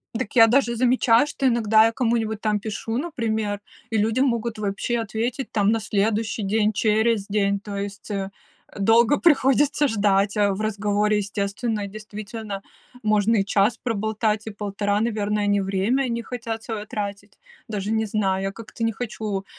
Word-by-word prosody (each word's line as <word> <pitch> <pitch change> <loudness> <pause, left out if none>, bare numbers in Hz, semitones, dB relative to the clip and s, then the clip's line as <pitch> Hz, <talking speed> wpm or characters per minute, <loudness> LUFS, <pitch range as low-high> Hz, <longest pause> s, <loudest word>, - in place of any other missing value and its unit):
Дак 230 0 -4
я 225 -1 +9
даже 240 0 +2
замечаю, 245 0 +4
что 275 -2 -1
иногда 220 -2 +4
я 225 - +2
кому-нибудь 225 -2 0
там 215 -1 0
пишу, 225 +2 -4
например, 220 -9 -2 0.3
и 225 - 0
люди 220 +4 +1
могут 235 -4 0
вообще 210 +4 -1
ответить 230 +4 -3
там 205 -1 +2
на 225 - +1
следующий 215 +1 -1
день, 210 +2 +2
через 220 0 +1
день, 200 -1 +1
то 205 0 -7
есть, 200 +1 -6
э, 195 -1 -2 0.5
долго 230 +6 +4
приходится 285 -2 +3
ждать, 205 -2 +1
а 205 -1 +3
в 195 - -4
разговоре, 210 0 +1
естественно, 205 +1 -2
действительно 215 0 -7 0.4
можно 215 +1 +2
и 195 - +1
час 210 +3 +2
проболтать, 220 -1 -1
и 220 - -5
полтора, 205 0 -1
наверное, 210 -2 0
они 205 -1 +2
время 200 +8 0
не 235 0 -2
хотят 225 -2 -5
свое 215 -3 -5
тратить. 205 -1 -6 0.3
Даже 210 -2 -3
не 220 0 +1
знаю, 195 -2 0
я 195 - -1
как-то 230 +2 -8
не 225 - +2
хочу, 210 -4 -4
215 Hz, 160 wpm, -23 LUFS, 205-230 Hz, 0.5 s, я